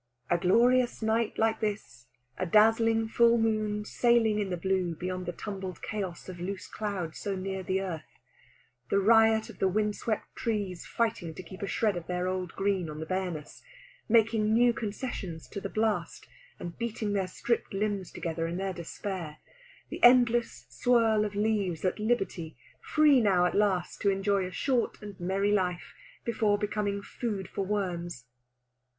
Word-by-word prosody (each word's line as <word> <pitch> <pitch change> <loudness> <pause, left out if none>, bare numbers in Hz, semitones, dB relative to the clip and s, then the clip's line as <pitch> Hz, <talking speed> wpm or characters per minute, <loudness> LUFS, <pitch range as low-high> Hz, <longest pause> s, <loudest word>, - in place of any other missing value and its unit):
A 175 - +4
glorious 240 +6 +3
night 220 0 +1
like 220 0 +2
this; 200 - -4 0.3
a 185 - -2
dazzling 225 +3 +4
full 235 +1 +4
moon 215 -2 0
sailing 230 -2 +3
in 200 -2 -1
the 180 - -2
blue 185 -1 0
beyond 185 +1 -4
the - - -1
tumbled 190 0 -6
chaos 195 -5 -4
of 180 -2 -8
loose 185 +2 -4
cloud 195 -7 -4
so 200 -2 -3
near 190 0 -3
the 190 +1 -1
earth; 175 -5 -6 0.7
the - - +2
riot 220 +2 +5
of - - -12
the 190 - +3
wind 210 +2 0
swept 220 -2 -3
trees 205 -6 -3
fighting 205 -8 -1
to 185 - -8
keep 185 +2 -11
a 200 - -2
shred 210 -2 +1
of 175 -1 -6
their 180 0 -1
old 185 -2 -3
green 195 -4 0
on 150 - -7
their 160 - -5
bareness, 180 -4 -4 0.5
making 220 -1 +3
new 240 +2 +5
concessions 200 -7 -5
to 200 - -6
the 195 - -4
blast, 215 0 -1 0.3
and 175 +4 -7
beating 225 -3 -2
their 195 -2 0
stripped 235 +5 -2
limbs 200 -2 -2
together 165 0 -3
in 170 +1 -3
their 190 0 -2
despair; 170 -2 -6 0.5
the - - -6
endless 240 - +5
swirl 220 - +3
of 205 -1 -5
leaves 205 -5 0
at 185 - 0
liberty, 195 -8 -1 0.2
free 300 -4 +4
now 190 -5 +4
at 180 - +1
last 200 -4 +1
to 200 - +3
enjoy 195 -1 +1
a - - -8
short 250 +6 0
and 205 -2 -9
merry 195 +3 0
life 180 -4 -1 0.3
before 220 -3 +2
becoming 205 -1 -2
food 205 -6 -4
for 195 - -3
worms. 175 -8 -3
200 Hz, 170 wpm, -29 LUFS, 180-220 Hz, 0.7 s, riot